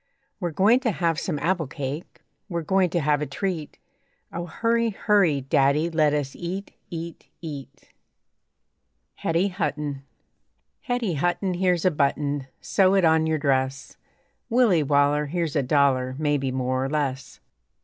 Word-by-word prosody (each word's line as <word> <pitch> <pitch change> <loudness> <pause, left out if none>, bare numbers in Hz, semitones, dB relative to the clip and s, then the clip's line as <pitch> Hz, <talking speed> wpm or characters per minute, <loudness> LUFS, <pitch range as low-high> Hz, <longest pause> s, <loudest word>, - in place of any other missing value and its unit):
We're 175 -3 -1
going 200 +9 +4
to 260 -3 0
have 170 -3 0
some 170 -4 -2
apple 170 0 0
cake, 145 +3 -6 0.3
We're 170 -2 -2
going 190 +2 +2
to 170 0 0
have 150 0 +1
a 150 - -2
treat. 160 +1 -4 0.6
O 175 +1 -4
hurry, 230 +6 +1
hurry, 195 -8 +2
Daddy, 140 +5 +2
Let 155 -2 +3
us 140 -2 -3
eat, 185 +3 -5 0.2
eat, 170 0 -7
eat. 145 -5 -9 1.3
HETTY 170 +4 +1
HUTTON 150 -6 -3 0.8
Hetty 245 -7 -1
Hutton, 175 +5 0
Here's 180 -1 +1
a 185 - +5
button, 145 -2 0
Sew 190 -1 +3
it 190 -3 +4
on 160 0 +4
your 160 0 +1
dress. 135 -2 -1 0.5
Willie 230 -9 +4
Waller, 145 +1 +2
Here's 165 -1 -2
a 145 - +3
dollar, 130 -2 +2
Maybe 145 -3 0
more 130 0 -1
or 135 - -2
less. 140 -3 -3
160 Hz, 145 wpm, -24 LUFS, 140-180 Hz, 1.3 s, a